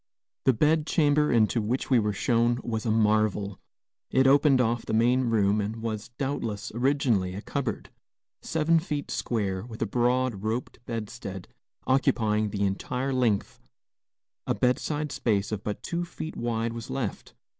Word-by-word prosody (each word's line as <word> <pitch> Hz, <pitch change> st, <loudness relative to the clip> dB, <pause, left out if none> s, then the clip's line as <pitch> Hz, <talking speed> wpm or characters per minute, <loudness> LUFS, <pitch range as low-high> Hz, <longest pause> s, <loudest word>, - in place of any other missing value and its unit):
The 130 Hz, -, +5 dB
bed 155 Hz, +5 st, +2 dB
chamber 150 Hz, -2 st, +3 dB
into 115 Hz, 0 st, +3 dB
which 120 Hz, +6 st, -2 dB
we 125 Hz, -, +6 dB
were 105 Hz, -1 st, 0 dB
shown 120 Hz, +3 st, +1 dB
was 110 Hz, -1 st, -3 dB
a -, -, +2 dB
marvel. 105 Hz, -2 st, +1 dB, 0.5 s
It 130 Hz, 0 st, +3 dB
opened 140 Hz, 0 st, +5 dB
off 120 Hz, -1 st, +1 dB
the -, -, -2 dB
main 125 Hz, +3 st, +3 dB
room 105 Hz, -3 st, +2 dB
and 105 Hz, +2 st, -3 dB
was, 110 Hz, -2 st, -4 dB
doubtless, 120 Hz, -7 st, -3 dB
originally 120 Hz, -7 st, +1 dB
a 100 Hz, -, -5 dB
cupboard. 140 Hz, -5 st, -3 dB, 0.5 s
Seven 160 Hz, +1 st, +2 dB
feet 150 Hz, -3 st, -4 dB
square, 100 Hz, -5 st, -1 dB
with 115 Hz, -1 st, -9 dB
a -, -, +1 dB
broad, 120 Hz, -1 st, +1 dB
roped 115 Hz, +4 st, -3 dB
bedstead 105 Hz, -4 st, -6 dB, 0.4 s
occupying 110 Hz, -5 st, +2 dB
the 100 Hz, 0 st, -2 dB
entire 125 Hz, +7 st, -2 dB
length, 120 Hz, -6 st, 0 dB, 0.9 s
a -, -, +1 dB
bedside 145 Hz, +4 st, 0 dB
space 105 Hz, -5 st, 0 dB
of 105 Hz, -2 st, -3 dB
but 105 Hz, -, -4 dB
two 170 Hz, 0 st, -2 dB
feet 160 Hz, -2 st, -7 dB
wide 115 Hz, -1 st, -1 dB
was 115 Hz, +2 st, -7 dB
left. 130 Hz, -6 st, -4 dB
115 Hz, 155 wpm, -27 LUFS, 105-130 Hz, 0.9 s, we